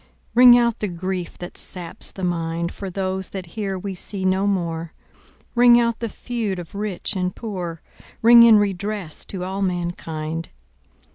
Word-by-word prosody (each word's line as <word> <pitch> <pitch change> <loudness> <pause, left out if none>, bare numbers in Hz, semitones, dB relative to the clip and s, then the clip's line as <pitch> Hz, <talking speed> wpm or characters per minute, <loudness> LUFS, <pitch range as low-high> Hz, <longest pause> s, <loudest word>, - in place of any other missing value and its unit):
Ring 245 0 +9
out 235 -1 +1
the 210 - -1
grief 180 0 -4
that 175 - -8
saps 175 -3 -6
the 190 - -9
mind, 170 -1 -1
For 195 - -6
those 190 0 -3
that 190 -2 -6
here 200 -3 -3
we 195 +1 -5
see 190 +1 -4
no 190 +2 +2
more, 170 -4 -2 0.6
Ring 240 0 +7
out 235 -1 0
the 230 - -3
feud 225 -4 -3
of 175 -2 -8
rich 205 0 -3
and 180 -1 -1
poor, 180 -7 -5 0.4
Ring 235 +1 +9
in 230 -2 +8
redress 200 -3 -2
to 185 -2 -6
all 190 +2 -3
mankind. 165 -3 -3
190 Hz, 160 wpm, -22 LUFS, 175-210 Hz, 0.6 s, Ring